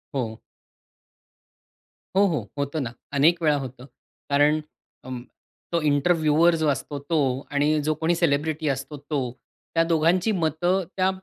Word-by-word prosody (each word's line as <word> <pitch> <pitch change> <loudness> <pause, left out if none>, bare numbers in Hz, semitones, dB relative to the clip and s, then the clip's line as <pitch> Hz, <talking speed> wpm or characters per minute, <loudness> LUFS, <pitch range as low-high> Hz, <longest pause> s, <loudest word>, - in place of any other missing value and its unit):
हो. 115 -4 -3 1.7
हो, 200 - +5
हो. 170 -6 -1
होतं 140 +2 -2
ना. 115 - -4 0.2
अनेक 165 +5 +4
वेळा 150 -2 +4
होतं. 130 -1 -7 0.4
कारण 145 +2 +3 0.4
अं, 130 -1 -5 0.5
तो 170 -1 +1
इंटरव्यूअर 155 +2 +3
जो 160 -1 0
असतो 145 +1 -2
तो 165 - +2 0.3
आणि 150 +2 +2
जो 155 +1 +1
कोणी 170 +2 +2
सेलिब्रिटी 155 -1 0
असतो 135 +2 -3
तो, 145 +1 -3 0.5
त्या 165 0 +4
दोघांची 170 +5 +2
मतं 175 +2 +1
त्या 185 0 +3
155 Hz, 135 wpm, -25 LUFS, 140-165 Hz, 1.7 s, हो